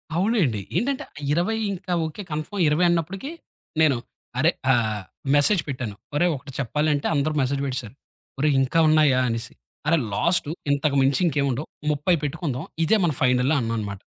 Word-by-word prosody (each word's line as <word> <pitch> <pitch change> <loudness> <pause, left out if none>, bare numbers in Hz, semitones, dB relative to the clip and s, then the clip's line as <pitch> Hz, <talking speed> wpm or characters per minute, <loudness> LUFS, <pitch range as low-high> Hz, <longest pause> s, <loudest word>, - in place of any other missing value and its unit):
అవునండి 175 - +1 0.2
ఏంటంటే, 275 +2 -1 0.3
20 180 +7 +1
ఇంకా 185 -1 -4
ఓకె 180 +6 -6
కన్ఫర్మ్ 155 +6 -3
20 160 +4 +3
అన్నప్పటికి, 180 - -2 0.5
నేను 145 -5 +4 0.4
అరె 165 +5 +4 0.2
ఆహ్, 110 -4 0 0.3
మెసేజ్ 155 +6 +4
పెట్టాను 120 -7 -4 0.2
ఒరేయ్ 175 +1 +3
ఒకటి 135 +1 -9
చెప్పాలి 150 +5 0
అంటే 145 - -1
అందరు 150 +1 +1
మెసేజ్ 135 +1 0
పెట్టేసారు 130 -3 -4 0.4
"ఒరేయ్ 150 -1 +3
ఇంకా 135 +5 +1
ఉన్నాయా?" 150 -4 +4
అనేసి, 115 0 -3 0.3
అరె 165 0 +4
లాస్ట్ 170 - +1 0.2
ఇంతకు 140 0 +1
మించి 135 +3 +2
ఇంకేమి 140 -2 +1
ఉండవు 135 +6 -3 0.2
30 150 +5 +2
పెట్టుకుందాం 145 0 -3 0.2
ఇదే 220 - +4
మనం 155 -6 +1
ఫైనల్ 125 +2 +3
అన్నా 115 -1 -1
అనమాట. 100 -2 -5
145 Hz, 155 wpm, -24 LUFS, 130-170 Hz, 0.5 s, నేను